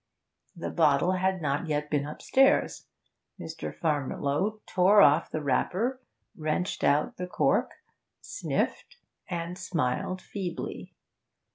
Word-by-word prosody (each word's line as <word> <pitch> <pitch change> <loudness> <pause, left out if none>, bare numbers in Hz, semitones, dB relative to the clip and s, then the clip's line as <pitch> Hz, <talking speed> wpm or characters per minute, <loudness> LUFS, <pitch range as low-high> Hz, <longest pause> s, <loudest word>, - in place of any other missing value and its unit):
The - - -5
bottle 145 +5 +3
had 185 -1 0
not 145 +3 -1
yet 150 -1 -2
been 145 -1 0
upstairs. 265 - +2 0.5
Mr. 160 0 -6
Farmiloe 150 +6 -1
tore 190 +3 +4
off 155 -3 +5
the 155 - -4
wrapper, 205 - 0 0.3
wrenched 155 +3 -2
out 145 +2 +2
the 180 - -4
cork, - - +1 0.5
sniffed - - -3 0.3
and 175 0 -4
smiled 180 0 -1
feebly. 185 -3 -6
170 Hz, 110 wpm, -28 LUFS, 150-185 Hz, 0.5 s, off